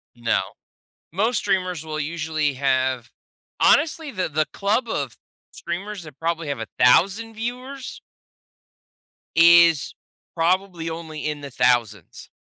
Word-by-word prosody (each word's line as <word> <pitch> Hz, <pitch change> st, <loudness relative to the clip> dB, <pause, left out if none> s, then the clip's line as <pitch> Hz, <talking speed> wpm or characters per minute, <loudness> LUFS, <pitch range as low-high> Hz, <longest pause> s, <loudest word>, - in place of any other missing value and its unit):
No. 120 Hz, -1 st, +1 dB, 0.7 s
Most 220 Hz, +7 st, +1 dB
streamers 180 Hz, -4 st, -1 dB
will 155 Hz, -1 st, -4 dB
usually 155 Hz, -1 st, -1 dB
have 130 Hz, -3 st, 0 dB, 0.5 s
honestly, 310 Hz, 0 st, +3 dB
the 185 Hz, -5 st, -2 dB
the 155 Hz, 0 st, 0 dB
club 220 Hz, +5 st, 0 dB
of -, -, -3 dB, 0.3 s
streamers 195 Hz, +3 st, -6 dB
that 150 Hz, -3 st, -13 dB
probably 165 Hz, -2 st, -2 dB
have 140 Hz, -5 st, -3 dB
1,000 195 Hz, -, +2 dB
viewers 250 Hz, +4 st, -6 dB, 1.4 s
is 170 Hz, -2 st, +6 dB, 0.4 s
probably 175 Hz, 0 st, 0 dB
only 160 Hz, -2 st, -7 dB
in 150 Hz, -1 st, -4 dB
the 140 Hz, -, -7 dB
thousands. 120 Hz, -7 st, 0 dB
165 Hz, 110 wpm, -23 LUFS, 145-200 Hz, 1.4 s, is